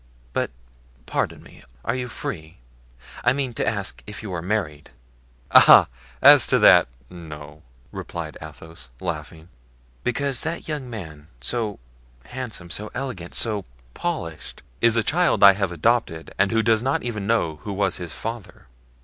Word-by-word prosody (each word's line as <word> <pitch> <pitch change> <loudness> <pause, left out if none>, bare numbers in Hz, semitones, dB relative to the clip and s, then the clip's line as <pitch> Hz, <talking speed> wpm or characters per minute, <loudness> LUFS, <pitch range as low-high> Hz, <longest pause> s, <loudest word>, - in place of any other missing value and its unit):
But - - 0 0.6
pardon - - -2
me, - - -16 0.2
are 115 - 0
you 125 -1 -3
free? 80 -8 -6 0.7
I 125 - +4
mean 135 -3 -2
to - - -2
ask 100 -3 -2
if 105 0 -8
you 100 -4 -5
are 85 - -3
married?" 85 -6 -3 0.6
"Ah! - - +8 0.3
as - - +9
to - - +4
that, - - +7 0.2
no," 75 -3 -10 0.3
replied - - -6
Athos, 80 -3 -11
laughing. 80 +1 -6 0.6
"Because 135 +1 0
that 165 +2 -4
young 150 -5 -4
man, 80 -10 -8
so 105 - -2 0.5
handsome, 115 -9 -6
so 105 +4 -4
elegant, 125 -10 -5
so 105 -4 -1 0.3
polished——" 85 - -5 0.2
"Is 115 -1 +4
a 115 - +3
child 175 -4 +2
I 100 -1 +10
have 100 -2 -2
adopted 85 -2 0
and 100 - +3
who 115 0 +2
does 110 -1 +3
not 135 +3 0
even 110 -5 -4
know 95 -9 +1
who 100 +8 -7
was 95 -1 0
his 85 -4 -6
father." 115 -2 -7
105 Hz, 150 wpm, -23 LUFS, 80-120 Hz, 0.7 s, I